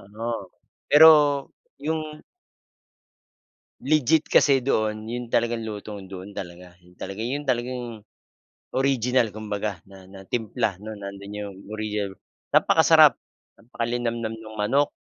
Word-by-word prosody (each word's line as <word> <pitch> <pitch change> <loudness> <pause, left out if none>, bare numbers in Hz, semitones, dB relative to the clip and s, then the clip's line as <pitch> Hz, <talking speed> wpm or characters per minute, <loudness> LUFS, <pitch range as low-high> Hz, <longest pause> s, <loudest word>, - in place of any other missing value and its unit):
Oo, 115 -3 -4 0.4
pero 160 +2 +9 0.7
yung 155 0 -3 1.6
legit 155 +1 +3
kasi 135 -3 +4
doon 110 -4 0
'yon 120 +1 -5
talagang 120 0 0
lutong 105 -3 -7
doon 95 +1 -9
talaga. 90 -2 -9
'Yon 90 0 -22
talaga 100 +3 -7
'yon 135 +6 -3
talagang 120 -3 -3 0.7
original 130 -3 +2
kumbaga, 105 -2 -4
na 95 -1 -15
na 95 -1 -12
timpla, 115 -2 -1
'no, 110 - -7
nandoon 100 +1 -8
'yong 100 -2 -7
original 105 -2 -3 0.4
napakasarap, - - +6 0.4
napakalinamnam 115 -1 -3
nung 110 0 -11
manok, 135 +8 +2
110 Hz, 110 wpm, -24 LUFS, 100-125 Hz, 1.6 s, pero